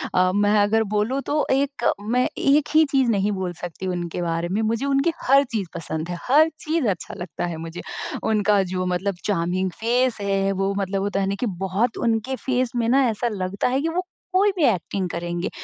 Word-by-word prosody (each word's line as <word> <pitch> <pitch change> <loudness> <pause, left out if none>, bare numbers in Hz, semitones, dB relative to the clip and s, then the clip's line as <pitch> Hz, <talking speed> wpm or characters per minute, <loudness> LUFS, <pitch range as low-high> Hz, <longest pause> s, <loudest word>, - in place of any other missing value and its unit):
अ, 185 0 +4
मैं 205 +1 +3
अगर 220 +2 +3
बोलूँ 235 +7 +1
तो 295 0 +1
एक 275 -2 0 0.2
मैं 245 +4 +1
एक 285 +2 +3
ही 315 0 +7
चीज़ 265 -3 +3
नहीं 205 0 +1
बोल 190 -3 -3
सकती 175 +2 -5
उनके 175 -1 -3
बारे 165 0 -1
में। 205 +3 0
मुझे 225 +4 0
उनकी 280 +4 +2
हर 275 +2 +5
चीज़ 210 -5 -2
पसंद 160 0 -4
है। 175 - -3
हर 305 +4 +6
चीज़ 310 -4 0
अच्छा 185 -4 -2
लगता 175 -1 -4
है 170 -2 -4
मुझे। 165 +1 -7 0.4
उनका 210 -2 +3
जो 185 0 -1
मतलब 180 +2 -1
चार्मिंग 185 -1 0
फ़ेस 245 +2 +2
है, 195 -1 +1
वो 195 0 0
मतलब 195 0 -1
होता 200 0 -1
है 195 - 0
ना 195 - -1
कि - - 0 0.2
बहुत 210 +6 0
उनके 230 +3 0
फ़ेस 255 -2 +1
में 235 -1 +1
ना 270 +2 +4
ऐसा 225 +2 -1
लगता 190 -1 -2
है 260 +2 +1
कि 325 - 0
वो 345 +3 -1 0.3
कोई 400 +2 +4
भी 345 - 0
एक्टिंग 190 -3 0
करेंगे। 175 +1 -3
205 Hz, 205 wpm, -23 LUFS, 185-255 Hz, 0.4 s, ही